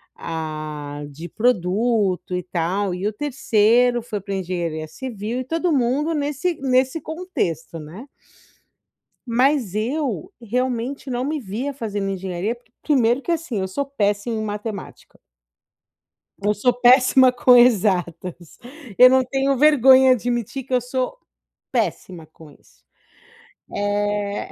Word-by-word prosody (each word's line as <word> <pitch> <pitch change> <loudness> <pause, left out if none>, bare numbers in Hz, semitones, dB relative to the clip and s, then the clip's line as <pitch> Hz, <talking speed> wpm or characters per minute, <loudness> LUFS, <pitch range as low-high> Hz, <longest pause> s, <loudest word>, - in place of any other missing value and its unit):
a 155 -2 -6
de 160 +5 -9
produto 205 -3 0
e 180 - -1
tal, 180 +2 -1
e 180 +2 -5
o 210 - 0
terceiro 240 -2 +2
foi 220 -3 -5
pra 200 +1 -6
engenharia 170 -4 -3
civil 235 +3 -5
e - - -4
todo 330 +4 -1
mundo 280 +5 +1
nesse 295 +4 -1
nesse 260 +3 +1
contexto, 315 - -4
né? 170 - -10 1.2
Mas 245 -3 +1
eu, 280 - -2
realmente 250 +3 -3
não 245 +1 -2
me 305 +2 -2
via 245 +6 -4
fazendo 205 -5 -3
engenharia 190 +3 -3
porque 240 -1 -26
primeiro 255 -4 +2
que - - -4
assim, 320 - -2
eu 190 - -2
sou 280 +10 -2
péssima 210 -4 -1
em 220 - -2
matemática. 210 -1 -7 1.2
Eu 205 +1 0
sou 245 +4 +2
péssima 255 +1 +5
com 250 0 +5
exatas. 185 -7 +1 0.4
Eu 255 0 +9
não 260 0 +4
tenho 270 +1 0
vergonha 265 -2 +6
de 240 - -5
admitir 240 +2 -3
que 260 - -11
eu 250 - +3
sou 255 - -3 0.5
péssima 185 -7 -2
com 160 -1 -16
isso. - - -23 1.1
Eh. 205 0 -1
230 Hz, 130 wpm, -21 LUFS, 190-260 Hz, 1.2 s, Eu